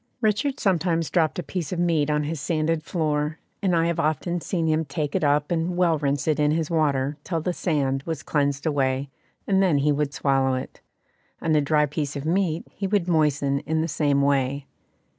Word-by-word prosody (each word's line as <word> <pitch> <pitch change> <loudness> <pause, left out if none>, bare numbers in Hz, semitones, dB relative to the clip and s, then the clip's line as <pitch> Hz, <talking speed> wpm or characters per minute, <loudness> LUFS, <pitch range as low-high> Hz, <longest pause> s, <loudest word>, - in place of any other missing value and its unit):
Richard 225 +5 0
sometimes 170 -4 +1
dropped 160 -4 +1
a 180 - -2
piece 175 -6 -4
of 180 - -2
meat 165 -4 +1
on 150 0 +1
his 150 -1 -4
sanded 160 0 0
floor, 155 -2 -1 0.2
and 185 -3 +2
I 165 0 +3
have 170 -1 -1
often 170 +3 0
seen 170 -2 -1
him 160 0 +2
take 145 0 -3
it - - 0
up 145 +1 +2
and 170 +1 -1
well 170 -4 +3
rinse 140 0 -1
it 155 -1 +2
in 150 0 +3
his 160 +1 0
water, 145 -3 +1
till 165 -3 -2
the 180 +3 -2
sand 140 -6 0
was 160 +2 -5
cleansed 140 -1 0
away, 135 -2 0 0.3
and 195 -1 +2
then 180 -6 +3
he 145 +2 +2
would 145 0 0
swallow 135 -2 +1
it; 130 - -7 0.6
and 160 -1 +1
a 150 - +4
dry 150 +1 +2
piece 145 0 -3
of 140 +1 -5
meat 170 -1 0
he 195 - -3
would 195 -3 +1
moisten 145 -4 +2
in 160 +2 -1
the 165 - -1
same 145 -2 +1
way. 140 0 +1
155 Hz, 205 wpm, -24 LUFS, 145-170 Hz, 0.6 s, a